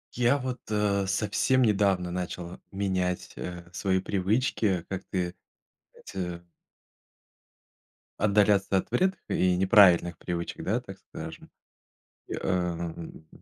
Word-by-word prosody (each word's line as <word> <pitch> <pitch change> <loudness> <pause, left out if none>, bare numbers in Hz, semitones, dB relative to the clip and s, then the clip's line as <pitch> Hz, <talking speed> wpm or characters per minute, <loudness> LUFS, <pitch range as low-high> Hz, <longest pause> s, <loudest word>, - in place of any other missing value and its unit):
Я 125 +3 +3
вот, 130 -2 -4
э, 100 -2 +1
совсем 110 +6 +2
недавно 95 -4 +2
начал 90 0 -5
менять, 95 -2 -1
э, 85 -1 -7
свои 95 0 +1
привычки, 100 -1 0
как 95 -1 -4
ты, 90 -2 -2 0.6
эти 90 -3 -6 1.8
отдаляться 100 -2 +3
от - - -3
вредных 190 +1 +1
и 90 -1 +2
неправильных 95 -3 +5
привычек, 85 -1 -4
да, - - +1
так - - -10
скажем, - - -9 0.8
и, - - -5
эм, 85 -3 -3
95 Hz, 105 wpm, -28 LUFS, 90-105 Hz, 1.8 s, неправильных